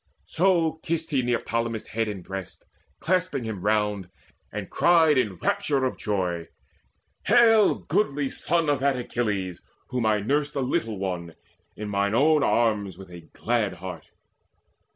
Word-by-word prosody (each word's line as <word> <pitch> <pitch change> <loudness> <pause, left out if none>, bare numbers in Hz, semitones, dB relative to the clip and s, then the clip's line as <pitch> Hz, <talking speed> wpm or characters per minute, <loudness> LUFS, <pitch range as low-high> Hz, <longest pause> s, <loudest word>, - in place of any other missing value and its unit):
So 165 -3 +1
kissed 165 0 -2
he 135 -3 +2
Neoptolemus' 115 -2 -1
head 115 0 -1
and 100 -4 -5
breast, 95 -1 -8 0.3
Clasping 180 -6 0
him 110 -5 -5
round, 105 -2 0 0.4
and - - -5
cried 165 -3 +4
in 105 -7 +1
rapture 135 - 0
of 130 - -1
joy: 90 -5 -2 0.8
"Hail, 225 -3 +6
goodly 150 -7 0
son 165 +4 0
of 145 -2 +2
that 135 -1 +1
Achilles 105 -7 -2 0.3
whom 125 -3 0
I 105 -1 +3
nursed 145 +7 -1
a 140 - 0
little 115 -4 -1
one 90 -3 -4 0.4
in 105 - -5
mine 100 +1 0
own 150 +4 +4
arms 105 -8 +1
With 95 -2 -12
a 85 - -9 0.2
glad 115 -5 0
heart. 90 -2 -8
115 Hz, 145 wpm, -25 LUFS, 100-145 Hz, 0.8 s, Hail